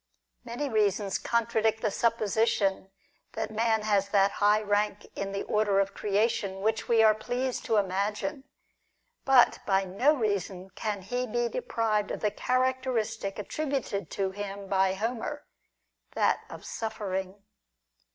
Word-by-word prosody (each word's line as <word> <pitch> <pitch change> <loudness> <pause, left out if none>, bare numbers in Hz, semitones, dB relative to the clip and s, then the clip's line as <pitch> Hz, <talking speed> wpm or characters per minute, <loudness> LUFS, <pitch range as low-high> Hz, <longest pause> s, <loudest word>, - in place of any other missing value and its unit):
Many 245 +5 -4
reasons 205 -4 +1
con 235 -1 +1
tradict 220 -1 +1
the 215 - 0
supposition 215 -3 +1 0.4
that 220 -1 -3
man 220 0 +1
has 200 -2 +1
that 200 -1 +4
high 210 +1 +3
rank 205 0 0
in 195 0 -3
the 195 - -3
order 210 -2 +2
of 195 0 0
creation 205 -1 0
which 220 +1 0
we 230 -1 +5
are 215 -1 +7
pleased 245 +4 -3
to 225 - +2
imagine; 200 +6 -1 0.8
but 265 -3 +5
by 195 -1 +3
no 245 +12 +2
reason 195 -5 -2
can 205 -2 -4
he 250 +5 -2
be 240 +1 0
deprived 225 - -1
of - - -4
the 210 - +1
characteristic 250 -5 -1
attributed 245 - -3
to 195 -1 -2
him 200 0 -6
by 190 -1 +2
Homer 235 +7 -3 0.3
— - - -50
that - - +1
of - - -10
suffering. 195 -3 -4
215 Hz, 140 wpm, -28 LUFS, 195-230 Hz, 0.8 s, are